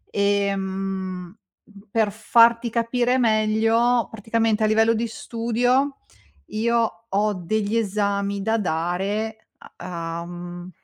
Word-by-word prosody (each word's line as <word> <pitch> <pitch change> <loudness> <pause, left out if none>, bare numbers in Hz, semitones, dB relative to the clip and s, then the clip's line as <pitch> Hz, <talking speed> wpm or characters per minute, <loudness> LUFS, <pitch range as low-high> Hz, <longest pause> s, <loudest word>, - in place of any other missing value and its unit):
Ehm, 195 -2 -1 0.5
per 220 -1 +2
farti 230 +2 +4
capire 240 +2 +1
meglio, 225 +1 +2
praticamente 225 0 0
a - - +4
livello 225 +1 +4
di 230 +1 -1
studio 245 +5 0 0.5
io 230 0 0
ho 210 +2 +1
degli 205 +4 -2
esami 200 -1 -1
da 220 +3 +1
dare 200 +5 -2 0.3
a 170 -2 -5
a, - - -7
mhmm, 175 0 -8
215 Hz, 105 wpm, -23 LUFS, 195-230 Hz, 0.5 s, farti